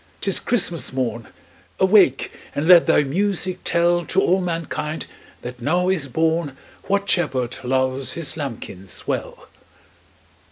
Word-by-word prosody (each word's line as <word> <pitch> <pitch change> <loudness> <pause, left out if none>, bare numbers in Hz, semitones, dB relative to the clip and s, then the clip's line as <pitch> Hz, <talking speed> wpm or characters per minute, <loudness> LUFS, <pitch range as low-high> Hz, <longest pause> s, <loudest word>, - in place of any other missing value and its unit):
't - - -4
is 190 - +3
Christmas 175 - +1
morn 120 -4 -3 0.5
Awake 190 -9 +4 0.2
and 150 +3 -1
let 175 -2 +7
thy - - +4
music 185 +4 -1
tell 175 0 +2
To 190 - +1
all 190 0 +2
mankind 165 -2 -3 0.4
that 125 0 -8
now 175 +8 +1
is 170 -7 +1
born 160 0 -1 0.3
What 200 0 0
Shepherd 130 -10 0
loves 130 +1 -1
His 165 -2 -2
lambkins 115 - -6
well!" - - -4
160 Hz, 130 wpm, -21 LUFS, 130-180 Hz, 0.5 s, let